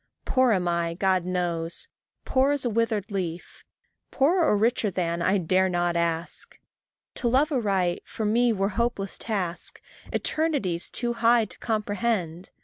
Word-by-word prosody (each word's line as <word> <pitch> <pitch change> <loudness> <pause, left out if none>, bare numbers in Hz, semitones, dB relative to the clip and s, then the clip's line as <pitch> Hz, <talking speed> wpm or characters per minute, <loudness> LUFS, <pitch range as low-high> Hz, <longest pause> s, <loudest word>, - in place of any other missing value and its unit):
Poor 255 -2 +3
am 185 -4 +1
I, 170 -1 0
God 185 -1 +1
knows, 175 -2 -2 0.4
poor 270 +2 +3
as 285 -3 -1
withered 225 -3 0
leaf; 175 -3 -5 0.5
Poorer 330 +6 +3
or 210 - +3
richer 225 0 +2
than, 170 -2 -2
I 190 +3 +3
dare 185 +1 +2
not 175 -1 0
ask. 170 0 -2 0.6
To 240 - -2
love 275 +6 +3
aright, 195 -9 0
for 220 - -5
me 235 +3 +3
were 195 -2 0
hopeless 215 -2 -2
task, 185 -6 -3 0.3
Eternities 275 - 0
too 240 -1 -2
high 230 0 +4
to - - -9
comprehend. 205 -5 -2
200 Hz, 145 wpm, -26 LUFS, 175-235 Hz, 0.6 s, high